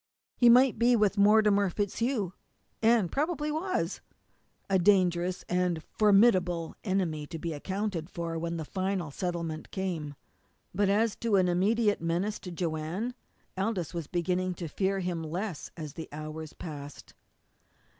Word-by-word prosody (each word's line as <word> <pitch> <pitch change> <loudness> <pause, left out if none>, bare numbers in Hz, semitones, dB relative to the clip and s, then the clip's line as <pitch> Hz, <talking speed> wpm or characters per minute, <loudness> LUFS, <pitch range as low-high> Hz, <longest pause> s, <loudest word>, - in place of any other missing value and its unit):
He 240 - +6
might 250 0 +6
be 240 +1 +5
with 210 -2 +2
Mortimer 205 -1 +5
FitzHugh, 205 +1 -1 0.5
and 225 -5 +3
probably 300 +1 -1
was 365 +5 -2 0.7
a 195 -1 +3
dangerous 180 -1 +2
and 180 -2 0
formidable 190 -6 +3
enemy 175 -7 -1
to 165 - -6
be 165 +1 -4
accounted 190 +1 -3
for 170 -3 -4
when 170 +1 -3
the 160 - -4
final 185 -3 -2
settlement 170 -1 -4
came. 170 -7 -3 0.6
But 200 +2 +2
as 215 +2 +2
an 200 -5 +3
immediate 205 +4 +2
menace 175 +6 -1
to 180 - -8
Joanne, 170 +7 -3 0.4
Aldous 190 -3 -2
was 170 -4 -4
beginning 180 +1 -1
to 170 - -5
fear 195 +5 -1
him 175 -2 -2
less 175 +2 -4
as 155 -3 -6
the 160 - -7
hours 155 +1 -7
passed. 145 -3 -9
185 Hz, 135 wpm, -29 LUFS, 165-210 Hz, 0.7 s, He